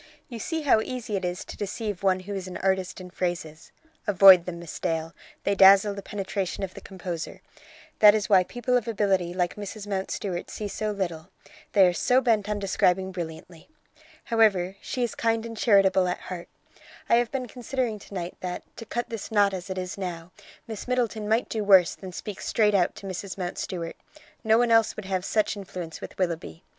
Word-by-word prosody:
"You 235 Hz, -3 st, -7 dB
see 320 Hz, +6 st, -3 dB
how 260 Hz, -6 st, +4 dB
easy 245 Hz, -3 st, -4 dB
it 190 Hz, -, -2 dB
is 180 Hz, 0 st, -3 dB
to -, -, -9 dB
deceive 205 Hz, -1 st, -4 dB
one 190 Hz, -1 st, +2 dB
who 200 Hz, +2 st, -6 dB
is 190 Hz, -2 st, -4 dB
an 180 Hz, -, -6 dB
artist 190 Hz, -1 st, -1 dB
in 180 Hz, -1 st, -10 dB
phrases. 170 Hz, -4 st, -4 dB, 0.4 s
Avoid 190 Hz, -3 st, +8 dB
them, 175 Hz, -1 st, -4 dB
Miss 170 Hz, -2 st, -8 dB
Dale; 165 Hz, 0 st, -2 dB, 0.3 s
they 200 Hz, -, +1 dB
dazzle 195 Hz, +1 st, +7 dB
the 200 Hz, -, -7 dB
penetration 195 Hz, -1 st, -3 dB
of 185 Hz, -1 st, -4 dB
the -, -, -10 dB
composer. 175 Hz, -3 st, -6 dB, 0.6 s
That 210 Hz, 0 st, +8 dB
is 210 Hz, -1 st, -1 dB
why 190 Hz, -4 st, +5 dB
people 245 Hz, +5 st, -2 dB
of 245 Hz, -2 st, +1 dB
ability 195 Hz, -5 st, +1 dB
like 180 Hz, 0 st, -1 dB
Mrs 210 Hz, 0 st, -6 dB
Mountstuart 190 Hz, -2 st, -3 dB
see 210 Hz, -, -5 dB
so 215 Hz, +1 st, -3 dB
little; 180 Hz, -4 st, -4 dB, 0.4 s
they 195 Hz, -2 st, +7 dB
are 180 Hz, -, +3 dB
so 250 Hz, +9 st, +3 dB
bent 220 Hz, -5 st, +1 dB
on 210 Hz, -, 0 dB
describing 190 Hz, -1 st, +1 dB
brilliantly. 170 Hz, -, -8 dB, 0.5 s
However, 200 Hz, -5 st, +2 dB
she 250 Hz, -, -3 dB
is 235 Hz, -, -1 dB
kind 225 Hz, 0 st, 0 dB
and 230 Hz, 0 st, -7 dB
charitable 195 Hz, -4 st, +4 dB
at 180 Hz, -, -2 dB
heart. 180 Hz, -2 st, -7 dB, 0.6 s
I 235 Hz, -, +5 dB
have 240 Hz, -1 st, +1 dB
been 255 Hz, -2 st, -3 dB
considering 245 Hz, -2 st, -3 dB
to 200 Hz, -, -14 dB
night 175 Hz, -1 st, -4 dB
that, 180 Hz, -1 st, -5 dB
to 230 Hz, -, -9 dB
cut 240 Hz, +1 st, -3 dB
this 225 Hz, -2 st, -6 dB
knot 205 Hz, -2 st, +4 dB
as 185 Hz, +1 st, -6 dB
it 190 Hz, -, -4 dB
is 185 Hz, +1 st, -4 dB
now, 175 Hz, -2 st, -5 dB, 0.3 s
Miss 220 Hz, 0 st, -7 dB
Middleton 230 Hz, -4 st, -1 dB
might 225 Hz, +3 st, +2 dB
do 220 Hz, -2 st, -2 dB
worse 190 Hz, -4 st, +6 dB
than 190 Hz, -1 st, -9 dB
speak 200 Hz, +2 st, -7 dB
straight 210 Hz, -2 st, +2 dB
out 185 Hz, -3 st, +2 dB
to -, -, -10 dB
Mrs. 190 Hz, +1 st, -5 dB
Mountstuart. 175 Hz, -2 st, -4 dB, 0.5 s
No 220 Hz, 0 st, +4 dB
one 240 Hz, 0 st, +2 dB
else 225 Hz, -1 st, +4 dB
would 215 Hz, -, -7 dB
have 190 Hz, -1 st, -1 dB
such 210 Hz, +1 st, +1 dB
influence 180 Hz, -5 st, -7 dB
with -, -, -9 dB
Willoughby. 170 Hz, -2 st, -3 dB
195 Hz, 200 wpm, -26 LUFS, 180-220 Hz, 0.6 s, Avoid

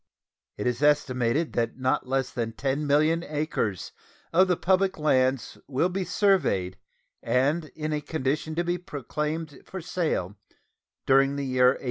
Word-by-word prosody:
It 105 Hz, -, -4 dB
is 125 Hz, +1 st, -1 dB
estimated 145 Hz, 0 st, +2 dB
that 115 Hz, 0 st, -1 dB
not 130 Hz, 0 st, 0 dB
less 130 Hz, -1 st, 0 dB
than 115 Hz, -2 st, -3 dB
10,000,000 150 Hz, +5 st, +1 dB
acres 145 Hz, -, -2 dB, 0.4 s
of 185 Hz, +3 st, +5 dB
the 180 Hz, -2 st, +1 dB
public 190 Hz, +1 st, +2 dB
lands 130 Hz, -4 st, +1 dB
will 140 Hz, +6 st, +1 dB
be 185 Hz, +1 st, -2 dB
surveyed 150 Hz, -, +1 dB, 0.4 s
and 145 Hz, +6 st, +1 dB
be -, -, -12 dB
in 155 Hz, 0 st, -2 dB
a 150 Hz, -, -1 dB
condition 155 Hz, +1 st, -2 dB
to 175 Hz, -, +1 dB
be 175 Hz, +1 st, -1 dB
proclaimed 150 Hz, 0 st, -4 dB
for 190 Hz, -, -7 dB
sale 160 Hz, -, -2 dB, 0.7 s
during 135 Hz, +1 st, +4 dB
the 140 Hz, -1 st, -3 dB
year 130 Hz, -1 st, +3 dB
1848. 130 Hz, -, +2 dB
145 Hz, 150 wpm, -26 LUFS, 130-165 Hz, 0.7 s, of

